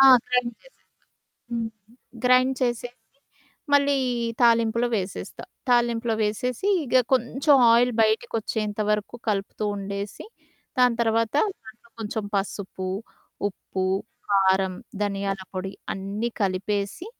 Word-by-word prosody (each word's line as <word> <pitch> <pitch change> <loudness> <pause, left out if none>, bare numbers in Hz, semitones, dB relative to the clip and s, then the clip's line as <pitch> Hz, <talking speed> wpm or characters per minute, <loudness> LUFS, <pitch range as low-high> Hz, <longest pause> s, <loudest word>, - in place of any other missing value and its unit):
ఆ! - - +9 0.2
గ్రైండ్ 250 -1 +1
జేసేస్తా. - - -22 0.7
హ్మ్. 230 -1 -1 0.5
గ్రైండ్ 255 +1 +5
చేసేసి, 240 -1 0 0.8
మళ్ళీ 285 0 +4 0.5
తాలింపులో 230 0 +4
వేసేస్తా. 190 -1 -5 0.2
తాలింపులో 235 -1 +2
వేసేసి 250 - -1 0.2
ఇగ 255 - +2 0.2
కొంచెం 265 +4 +3 0.2
ఆయిల్ 245 +1 +4
బయటికొచ్చేంత 215 -1 -1
వరకు 210 +3 -1
కలుపుతూ 200 +1 -1
ఉండేసి, 200 0 -5 0.5
దాని 250 -2 +4
తర్వాత 225 0 +1 0.3
దాంట్లో 225 +1 -15
కొంచెం 215 -1 -3
పసుపు, 195 -1 -3 0.6
ఉప్పు, 190 -1 -4 0.4
కారం, 190 -1 +3 0.3
ధనియాల 195 -1 -1
పొడి 190 +1 -3 0.2
అన్నీ 200 +4 -3
కలిపేసి 200 - -1
220 Hz, 100 wpm, -25 LUFS, 200-240 Hz, 0.8 s, ఆ